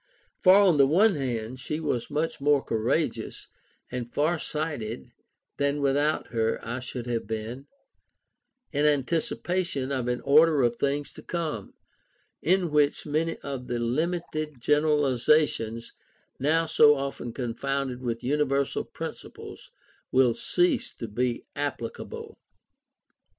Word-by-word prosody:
For, 185 0 +7
on 195 -6 +5
the 140 -1 +6
one 195 +9 +5
hand, 125 -4 -3
she 150 +4 -3
was 145 -7 -2
much 150 0 -2
more 145 -1 +3
courageous 110 -1 -1 0.4
and 120 -1 -4
far 160 +3 +1
sighted 145 - -4 0.5
than 140 +1 +1
without 145 +2 +1
her 115 -1 0
I 120 +3 -3
should 125 -1 -6
have 120 -3 -2
been, 115 +5 -5 1.0
in 150 0 +2
anticipation 150 0 0
of 130 -3 -1
an 125 0 0
order 150 0 +5
of 120 -1 +1
things 140 +2 -1
to - - -11
come, 155 - -4 0.7
in 180 -1 +2
which 150 -1 +2
many 160 +2 -1
of 135 -3 -5
the 120 -1 -2
limited 155 +3 -2
generalizations 145 -4 +2 0.5
now 160 +4 +2
so 150 -2 +6
often 135 -3 -4
confounded 130 +1 -3
with 115 -2 -3
universal 140 0 0
principles - - -9 0.4
will 130 -2 +4
cease 340 - +1
to 115 - -6
be 120 +2 -2
applicable. 140 -5 -5
140 Hz, 125 wpm, -27 LUFS, 125-155 Hz, 1.0 s, For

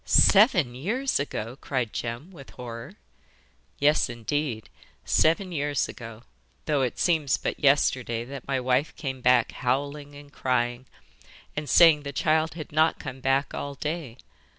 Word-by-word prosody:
'SEVEN 190 - +5
YEARS 225 - -1
AGO!' 120 -4 -4
cried 125 -6 -3
Jem, 120 +9 -5
with 140 -7 -13
horror. 115 -2 -8 0.8
'Yes, 150 -1 +3
indeed, 120 0 -3 0.4
seven 180 +4 +2
years 145 -3 -1
ago, 115 -2 -10 0.4
though 145 -3 +1
it 125 -2 -1
seems 155 -6 +2
but - - -4
yesterday 130 -5 +2
that 135 0 -9
my 135 -1 0
wife 130 +4 0
came 130 -3 -5
back 125 -1 +3
howling 140 +3 -3
and 145 0 -14
crying, 120 0 -1 0.7
and 150 -1 -4
saying 165 -3 +6
the 140 -1 -6
child 155 +2 +1
had 155 -3 -8
not 155 +2 +3
come 135 -3 -8
back 135 +2 0
all 140 0 -5
day. 150 -5 -5
140 Hz, 145 wpm, -26 LUFS, 125-155 Hz, 0.8 s, saying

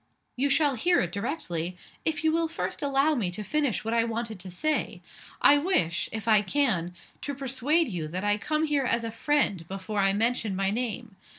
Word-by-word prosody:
"You 275 +3 +1
shall 285 +1 +3
hear 345 +9 +2
it 175 - -2
directly 180 - -3 0.3
if 320 0 0
you 315 - +3
will 330 +1 +1
first 330 - -4
allow 280 +2 +2
me 225 -10 0
to 185 +4 -5
finish 285 -3 0
what 225 - -1
I 230 0 +3
wanted 230 -2 -4
to 185 +1 -6
say. 300 +13 -1 0.4
I 290 - +7
wish 175 - 0
if 220 0 -5
I 215 -2 +6
can 190 -7 0 0.3
to 285 - -4
persuade 275 +5 +1
you 175 -8 -4
that 180 +5 -4
I 205 0 +1
come 305 +7 0
here 290 -3 +1
as 235 -1 +1
a 230 - -3
friend, 230 - +1
before 195 +2 -4
I 195 0 +3
mention 225 -1 0
my 195 0 0
name. 230 -2 -4
230 Hz, 200 wpm, -27 LUFS, 195-290 Hz, 0.4 s, I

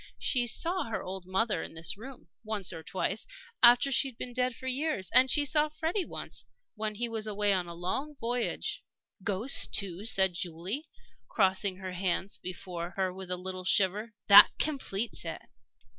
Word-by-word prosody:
She 245 -2 0
saw 340 +8 -1
her 225 - -4
old 185 -1 -7
mother, 210 +4 0
in - - -8
this 160 +1 0
room, 255 +5 -12 0.2
once 210 -5 0
or 165 - -7
twice, 190 +5 -2 0.3
after 245 +3 +7
she 270 +1 +3
had 255 -4 -11
been 245 - -7
dead 250 0 0
for 260 - -11
years. 260 - -1
And 260 +1 +7
she 290 +1 +4
saw 300 +1 +1
Freddie 325 +5 -2
once, - - -1 0.3
when 215 -1 -4
he 240 +3 -2
was 220 -2 -2
away 205 -1 +1
on 180 -2 -1
a 170 - -8
long 265 - -3
voyage 240 +1 -2 0.2
" - - -30
"Ghosts, 205 +8 +4
too!" 195 -1 -2
said 190 -4 +3
Julie, 180 - -4 0.4
crossing 190 -1 +1
her 190 -1 -6
hands 185 +1 -2
before 180 -1 -6
her 190 -1 0
with 190 -1 -9
a 180 - -1
little 185 0 -6
shiver 205 +4 +1
"that 200 - +10
completes 240 -7 -2
it." 165 -1 -5
205 Hz, 180 wpm, -29 LUFS, 185-250 Hz, 0.4 s, that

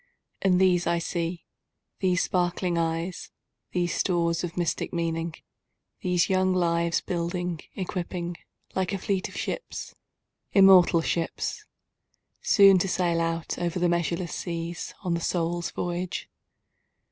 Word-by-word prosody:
And 185 -2 +3
these 180 -2 +3
I 170 0 +2
see—these 175 +2 -3
sparkling 175 0 0
eyes, 165 +1 -2 0.4
These 175 -1 0
stores 170 -2 +1
of 175 0 -5
mystic 175 -2 -1
meaning—these 170 +2 -3
young 185 -1 +2
lives, 170 -1 +1
Building, 175 -1 -2 0.2
equipping, 175 -2 -4 0.4
like 190 0 0
a - - 0
fleet 190 0 -1
of - - -10
ships—immortal 190 - +2
ships! 165 0 -2 0.8
Soon 195 -3 +6
to 195 - 0
sail 175 -2 +1
out 165 0 -2
over 175 0 -1
the 175 0 +2
measureless 170 0 -1
seas, 170 -1 -4
On 180 -2 0
the 170 - -1
Soul's 175 0 -1
voyage. 175 0 -3
175 Hz, 115 wpm, -27 LUFS, 170-185 Hz, 0.8 s, Soon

